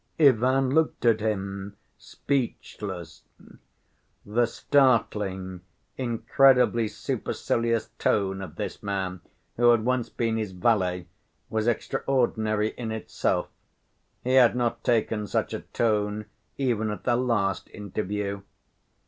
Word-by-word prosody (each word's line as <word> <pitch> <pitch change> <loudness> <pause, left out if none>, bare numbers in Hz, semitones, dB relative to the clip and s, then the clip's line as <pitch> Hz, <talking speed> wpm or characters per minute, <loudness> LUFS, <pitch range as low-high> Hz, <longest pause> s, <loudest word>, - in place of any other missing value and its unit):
Ivan 130 -1 +4
looked 160 -5 +1
at 115 -2 +4
him 100 -2 -3 0.2
speechless. 100 - -4 1.0
The 115 +3 +2
startling, 105 -10 +1 0.3
incredibly 125 -1 +3
supercilious 115 +2 -1
tone 95 -2 +1
of 90 -6 -8
this - - -5
man 95 -3 -3 0.4
who 120 0 +5
had 115 -2 +4
once 125 -1 0
been 115 -1 -1
his 105 -4 -3
valet, 90 -3 +1 0.5
was 110 0 0
extraordinary 110 -3 0
in 115 -2 -5
itself. 110 -1 -1 0.7
He 130 - 0
had 125 -3 +6
not 120 -1 -1
taken 110 -3 +1
such - - -1
a - - -2
tone 105 -2 0 0.3
even 115 -5 0
at 105 - -5
their 120 - +2
last 115 -7 0
interview. 100 0 -4
110 Hz, 110 wpm, -26 LUFS, 100-120 Hz, 1.0 s, had